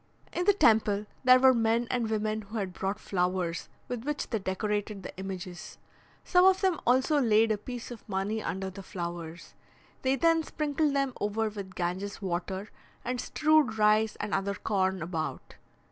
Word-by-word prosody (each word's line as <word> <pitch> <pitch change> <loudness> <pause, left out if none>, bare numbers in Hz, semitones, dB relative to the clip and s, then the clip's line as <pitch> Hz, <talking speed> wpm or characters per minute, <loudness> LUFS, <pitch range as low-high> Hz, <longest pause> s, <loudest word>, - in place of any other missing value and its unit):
In 355 - -1
the 410 - +6
temple, 215 - +3 0.2
there 255 0 +7
were 260 0 +7
men 230 0 +1
and 240 -3 0
women 215 0 -1
who 215 +2 -7
had 190 -3 -3
brought 195 +3 -3
flowers, 180 -2 -1 0.2
with 245 -2 -4
which 295 +1 -3
they 225 - 0
decorated 205 +1 -2
the - - -8
images. 185 -1 -7 0.5
Some 360 -1 +4
of 380 0 +5
them 375 -5 +2
also 260 +4 +4
laid 225 -2 +4
a 215 - +1
piece 245 +2 -7
of 230 -2 -11
money 205 +3 -1
under 190 -1 -3
the 195 +1 -9
flowers. 170 -3 -6 0.5
They 260 +1 +2
then 330 +4 +3
sprinkled 300 -2 -1
them 275 -2 +1
over 215 +2 0
with 200 -3 -8
Ganges' 185 +3 -3
water, 190 +2 -3 0.3
and 250 0 -2
strewed 305 -7 +2
rice 215 +1 +3
and 210 - -4
other 200 +1 0
corn 190 -3 0
about. 165 -2 -4
215 Hz, 170 wpm, -29 LUFS, 190-250 Hz, 0.5 s, there